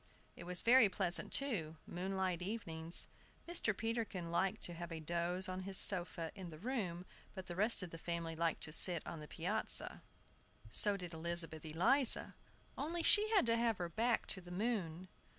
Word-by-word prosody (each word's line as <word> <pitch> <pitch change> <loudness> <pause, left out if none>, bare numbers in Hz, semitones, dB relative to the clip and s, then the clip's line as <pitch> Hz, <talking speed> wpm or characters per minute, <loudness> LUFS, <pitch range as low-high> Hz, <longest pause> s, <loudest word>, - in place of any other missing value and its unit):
It - - -11
was 180 0 +5
very 235 -2 +6
pleasant, 180 -2 -1
too, 195 - 0
moonlight 185 0 -3
evenings. 170 -5 0 0.4
Mr. 230 - 0
Peterkin 225 -7 -4
liked 190 +2 -1
to 175 - +2
take 170 0 -7
a 165 - -5
doze 175 +3 -1
on 185 0 -5
his 190 0 -2
sofa 175 -4 +1
in 190 -4 -9
the 155 - -11
room; 185 -5 -4 0.3
but 190 -2 -7
the 175 - -7
rest 210 +1 +4
of 175 - -8
the 165 - -9
family 170 -1 -4
liked 165 0 -1
to 155 - -4
sit 170 +1 +3
on 165 - -7
the 150 - -10
piazza. - - -1 0.7
So 205 - +1
did 180 -3 -7
Elizabeth 165 -1 -4
Eliza, 220 - +4 0.5
only 335 +4 -3
she 420 +5 +7
had 425 - +3
to 230 0 +2
have 230 -2 0
her 175 -1 -4
back 230 +5 0
to 190 - +1
the 175 - -14
moon. 185 -3 -3
180 Hz, 180 wpm, -36 LUFS, 170-220 Hz, 0.7 s, she